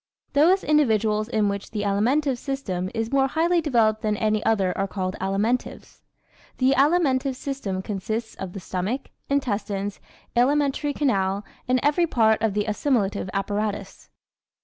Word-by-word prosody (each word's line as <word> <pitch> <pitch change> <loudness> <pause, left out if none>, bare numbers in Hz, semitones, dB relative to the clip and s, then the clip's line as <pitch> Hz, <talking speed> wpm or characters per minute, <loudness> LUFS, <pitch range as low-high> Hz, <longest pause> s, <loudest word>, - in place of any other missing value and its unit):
_ - - -42
Those 345 +7 +4
individuals 220 -8 +2
in 215 -3 +1
whom 200 0 -1
the 210 -2 -2
alimentive 245 +7 +1
system 190 -11 -3
is 225 0 -2
more 270 -1 +3
highly 335 +5 +2
developed 225 -8 +2
than 210 -1 0
any 215 0 +1
other 195 -5 +1
are 195 - -1
called 185 -1 -3
Alimentives. 205 +6 -2 0.6
The 260 0 +3
alimentive 275 -3 +2
system 235 -9 -4
consists 215 +3 -3
of 190 -2 -7
the 195 - -6
stomach, 190 +9 -3 0.2
intestines, 205 -7 -1 0.4
alimentary 285 +3 +2
canal 200 -8 0 0.2
and 255 0 +3
every 300 +4 +3
part 220 -6 +3
of 215 -2 0
the 210 0 +1
assimilative 210 -4 0
apparatus. 205 0 -3
220 Hz, 145 wpm, -24 LUFS, 200-275 Hz, 0.6 s, Those